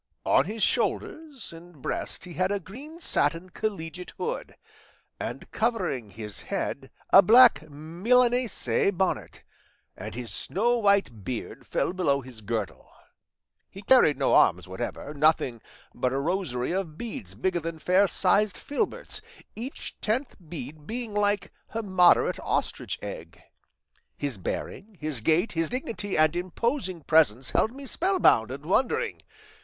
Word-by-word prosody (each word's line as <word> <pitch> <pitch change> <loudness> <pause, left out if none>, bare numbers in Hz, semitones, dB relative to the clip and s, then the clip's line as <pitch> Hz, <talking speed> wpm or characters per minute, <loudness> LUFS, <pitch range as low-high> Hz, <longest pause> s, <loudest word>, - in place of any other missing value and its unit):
On 135 - +4
his 215 +3 -3
shoulders 300 - -1
and 165 -1 -14
breast 130 - -3
he 180 - -9
had 185 +2 0
a 205 - 0
green 275 - -11
satin 180 - +1
collegiate 180 -4 -5
hood, 480 +2 -4 0.6
and - - -6
covering 190 - -1
his 105 +1 -6
head - - -4 0.2
a 195 - +10
black 220 -6 +6
Milanese 230 - +2
bonnet, 190 +1 -2 0.5
and - - -7
his 120 -4 -5
snow 235 +5 +1
white 200 - +2
beard 125 0 -6
fell - - 0
below 150 -7 +1
his 125 -4 -12
girdle. 110 -1 -4 0.8
He 195 - -11
carried 195 - +5
no 135 - +2
arms 90 +1 +4
whatever, 95 +9 -5
nothing 145 -6 +2 0.3
but 125 - -1
a 135 - -1
rosary 140 -5 -1
of 175 -4 -3
beads 110 - -6
bigger 175 - 0
than 165 0 -5
fair 185 +5 +3
sized 200 +3 +2
filberts, 295 +9 -2 0.3
each 245 +6 -7
tenth 245 +5 -1
bead 155 -2 -8
being 230 -1 -4
like 205 -1 0 0.2
a 225 - -1
moderate 185 -3 +4
ostrich - - -2
egg; - - -8 0.8
his 140 -8 -3
bearing, 200 - -5
his 150 -6 -3
gait, 165 - +2
his 165 -1 -1
dignity 225 -5 -3
and 155 +1 +4
imposing 185 - -2
presence 135 -6 +3
held 220 - +2
me 275 +2 -10
spellbound 345 - +3
and 140 +3 -7
wondering. 235 +9 0
180 Hz, 140 wpm, -27 LUFS, 145-220 Hz, 0.8 s, a